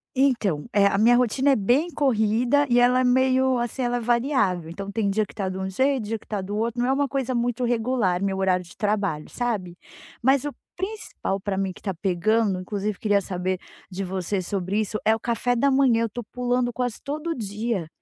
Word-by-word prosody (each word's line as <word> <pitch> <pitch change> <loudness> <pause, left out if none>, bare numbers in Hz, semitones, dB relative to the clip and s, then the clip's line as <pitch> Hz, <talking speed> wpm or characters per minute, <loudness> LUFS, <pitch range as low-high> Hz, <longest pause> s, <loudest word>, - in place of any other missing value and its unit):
Então, 230 - +1
eh, 200 -1 +5
a 200 - +1
minha 230 +4 +5
rotina 250 +3 +3
é - - +4
bem 255 - +2
corrida 250 0 +2
e 240 0 +4
ela 250 +1 +4
é - - +2
meio, 260 +1 +3
assim, 240 +2 -2
ela 245 0 0
é - - -1
variável, 235 - +1
então 195 +4 -6
tem 205 0 0
dia 215 +2 +1
que - - -17
tá 195 -3 -2
de 185 - -5
um 190 0 -3
jeito, 260 +4 +1
dia 225 +2 -2
que - - -22
tá 210 -2 -2
do 200 +2 -4
outro, 230 +2 -1
não 245 - +1
é - - +3
uma 280 +1 +1
coisa 265 -2 -2
muito 240 +1 -1
regular 230 -6 +1
meu 195 -1 -1
horário 185 -1 +1
de 175 - -15
trabalho, 200 -7 -1
sabe. 205 -8 -3 0.4
Mas 265 +2 +3
o 290 - -3 0.2
principal 380 - -4
pra 195 0 -3
mim 195 -1 -1
que - - -14
tá 195 - -3
pegando, 195 +3 +1
inclusive 205 +2 -3
queria 205 -2 +2
saber 185 -1 -2 0.3
de 195 +1 -4
você 190 +1 -2
sobre 190 +2 -2
isso, 215 0 -1
é 220 - +5
o - - -6
café 240 +1 0
da 280 +4 +3
manhã. 265 -4 +3
Eu 230 - -1
tô 240 +3 -6
pulando 245 +1 -1
quase 245 -2 -2
todo 305 +4 -3
dia, 210 -4 -3
225 Hz, 220 wpm, -24 LUFS, 195-250 Hz, 0.4 s, eh